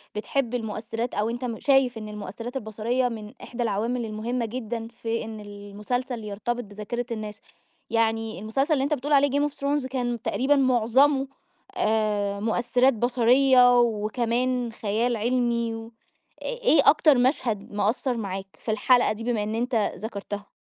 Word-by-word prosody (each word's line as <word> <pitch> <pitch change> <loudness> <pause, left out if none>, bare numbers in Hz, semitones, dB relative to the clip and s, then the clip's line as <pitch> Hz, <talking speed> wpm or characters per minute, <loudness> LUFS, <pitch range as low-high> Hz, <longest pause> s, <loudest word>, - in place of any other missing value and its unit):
بتحب 245 +3 -1
المؤثرات 225 +1 -4
أو 215 +2 0
أنت 240 +2 -4
م 230 -3 -4
شايف 270 -4 +3
إن 215 -1 -7
المؤثرات 210 +4 -7
البصريّة 235 +2 -1
من 215 -1 -8
إحدى 240 0 -4
العوامل 230 +3 -1
المهمة 230 +3 -2
جدًا 230 -1 -4
في 230 0 -4
إن 220 -1 -7
المسلسل 210 +4 -5
يرتبط 215 +4 -3
بذاكرة 210 +3 -5
الناس. 215 -2 -5 0.5
يعني 225 -2 0
المسلسل 270 - 0
اللي 270 - +1
أنت 285 +2 0
بتقول 290 +2 -1
عليه 285 0 +5
Game 290 +2 +1
of - - -21
Thrones 280 -1 -1
كان 245 -3 -2
تقريبًا 275 +3 +2
مُعظمه 265 +2 +3 0.5
آآ، 210 - +1
مؤثرات 240 +4 +2
بصريّة 245 +1 +5
وكمان 235 +2 0
خيال 225 +3 -1
علمي 235 0 0
و 225 0 -8 0.5
إ - - -8
إيه 480 - +3
أكتر 300 -2 +5
مشهد 245 -5 0
مأثّر 230 +5 0
معاك 195 -2 -4
في 220 - -3
الحلقة 245 +3 +3
دي 225 +1 -8
بما 230 -3 0
إن 215 +1 -3
أنت 245 +2 -1 0.2
ذَكرتها؟ 205 -1 -6
235 Hz, 150 wpm, -25 LUFS, 215-255 Hz, 0.5 s, عليه